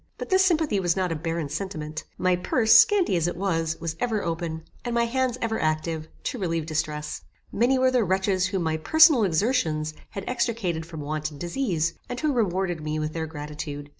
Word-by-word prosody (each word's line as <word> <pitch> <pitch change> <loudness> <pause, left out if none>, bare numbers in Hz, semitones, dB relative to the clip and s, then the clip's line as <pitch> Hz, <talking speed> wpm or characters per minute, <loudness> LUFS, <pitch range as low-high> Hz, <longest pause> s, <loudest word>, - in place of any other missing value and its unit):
But - - -6
this 380 0 +5
sympathy 315 - +2
was 175 -3 +1
not 185 -2 0
a - - -1
barren 165 0 -3
sentiment. 155 -1 -5
My 185 0 +2
purse, 220 +5 +2
scanty 360 - +6
as 170 -1 +1
it 175 - -3
was, 165 -4 -1
was 165 -1 -3
ever 225 -4 0
open, 165 -1 -3 0.2
and 240 -1 -2
my 235 - +3
hands 255 +1 0
ever 225 -1 -1
active, 155 0 -1 0.2
to 250 - -3
relieve 165 -4 -1
distress. 155 -1 -3 0.3
Many 245 +4 +2
were 260 0 +3
the 250 -2 +3
wretches 190 0 +1
whom 190 -2 -2
my 160 -1 0
personal 315 - +6
exertions 160 -5 +1 0.2
had 195 - -6
extricated 225 -10 -1
from 160 -3 -7
want 155 +1 -3
and 145 -2 -12
disease, 170 - -1 0.2
and 245 - -4
who 305 -2 +1
rewarded 190 -7 0
me 155 0 -3
with 155 0 -2
their 160 -1 -3
gratitude. 150 -1 -6
175 Hz, 195 wpm, -25 LUFS, 160-230 Hz, 0.3 s, scanty